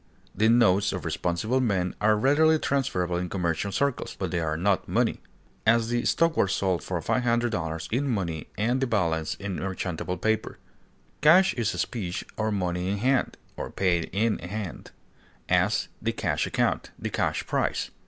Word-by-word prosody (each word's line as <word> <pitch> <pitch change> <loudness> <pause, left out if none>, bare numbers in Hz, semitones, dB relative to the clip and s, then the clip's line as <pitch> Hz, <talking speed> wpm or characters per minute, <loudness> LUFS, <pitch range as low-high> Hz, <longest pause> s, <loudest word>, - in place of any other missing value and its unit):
The 110 +3 +3
notes 105 -4 +4
of - - -5
responsible 110 +9 0
men 95 -7 0
are 105 0 +4
readily 155 +7 +4
transferable 110 - 0
in 90 0 -3
commercial 90 +1 -1
circles, 140 +7 -1
but - - -3
they 85 - 0
are 80 -1 -1
not 95 +3 +1
money; - - 0 0.4
as, 115 0 +3
the 120 0 0
stock 165 -1 +2
was 100 -6 +2
sold 95 -4 0
for - - -2
$500 115 -10 0
in 140 +4 +1
money 85 - -2
and 120 +6 +1
the 135 - +1
balance 85 -8 0
in 100 -2 -5
merchantable 95 -1 -3
paper. 110 0 -1 0.6
Cash 180 +6 +6
is 115 -4 -1
specie 95 -8 -3
or 110 0 -1
money 90 -2 -1
in 100 - -1
hand, 130 +4 +1 0.2
or - - -5
paid 90 -3 +1
in 110 +3 +1
hand; 100 +2 -6 0.6
as, - - +2
the - - -1
cash - - -1
account; - - 0
the - - -4
cash - - -1
price. - - -1
100 Hz, 165 wpm, -26 LUFS, 90-120 Hz, 0.6 s, Cash